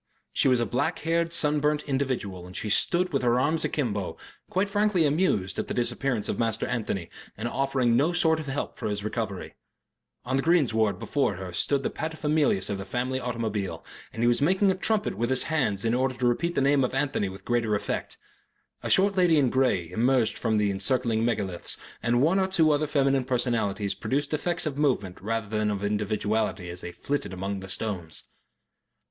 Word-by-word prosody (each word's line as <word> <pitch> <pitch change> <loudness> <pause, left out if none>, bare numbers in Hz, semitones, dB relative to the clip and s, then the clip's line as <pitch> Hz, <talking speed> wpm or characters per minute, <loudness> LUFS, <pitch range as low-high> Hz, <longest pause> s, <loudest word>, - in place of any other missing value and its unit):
She - - +2
was 130 -2 +4
a 120 - +1
black 145 - -1
haired, 165 0 +1
sun 150 -2 +2
burnt 150 +1 +1
individual 125 -10 -2
and 90 - -9
she 105 - -3
stood 180 - +2
with 140 - +1
her 120 0 +3
arms 155 +5 +1
akimbo, 105 - -2 0.3
quite 190 +2 +1
frankly 205 -4 +2
amused 140 - +1
at - - -2
the - - -4
disappearance 120 -1 -1
of - - -2
Master 115 -2 0
Anthony, 100 -7 -2 0.3
and 110 +3 -3
offering 130 -2 +1
no 145 +8 +3
sort 160 -2 +2
of 155 - -6
help 135 +1 -4
for - - -2
his 100 -1 -3
recovery. 105 -3 -4 0.7
On 130 +2 0
the - - +2
greensward 120 -11 +2
before 140 -8 0
her 90 -1 -7
stood 140 +9 +1
the - - -1
paterfamilias 155 -9 0
of 100 -1 -3
the - - -4
family 125 +6 -2
automobile, 110 -6 -3 0.3
and 115 - -3
he - - +4
was 120 +2 +2
making 190 +6 +3
a - - 0
trumpet 210 +2 0
with 120 +1 0
his 130 - +3
hands 115 -10 0
in 115 - +2
order 130 +1 +1
to 125 - -2
repeat 170 +9 +1
the - - +2
name 140 0 +3
of 125 - -1
Anthony 135 -8 0
with 95 +1 -11
greater 115 -3 +1
effect. 100 - -3 0.6
A - - -4
short 195 +1 +4
lady 175 -4 +4
in 135 -5 +3
grey 120 -11 +1
emerged 120 +3 +2
from 115 -2 -1
among - - +3
the 100 - +1
encircling 115 +3 0
megaliths, 100 -7 -2 0.2
and 120 +2 +2
one 175 +6 +3
or 190 - +2
two 165 -5 +3
other 150 +1 +1
feminine 135 -2 +2
personalities 115 -6 0
produced 145 +3 -2
effects 170 +3 0
of 145 -2 -3
movement 115 -11 0
rather 115 +1 -2
than 105 0 0
of 100 -1 -2
individuality 105 -2 -1
as 90 +1 -6
they 85 - -6
flitted 145 +2 -3
among 95 +2 -3
the 95 0 -9
stones. 95 -6 -3
125 Hz, 200 wpm, -27 LUFS, 105-150 Hz, 0.7 s, was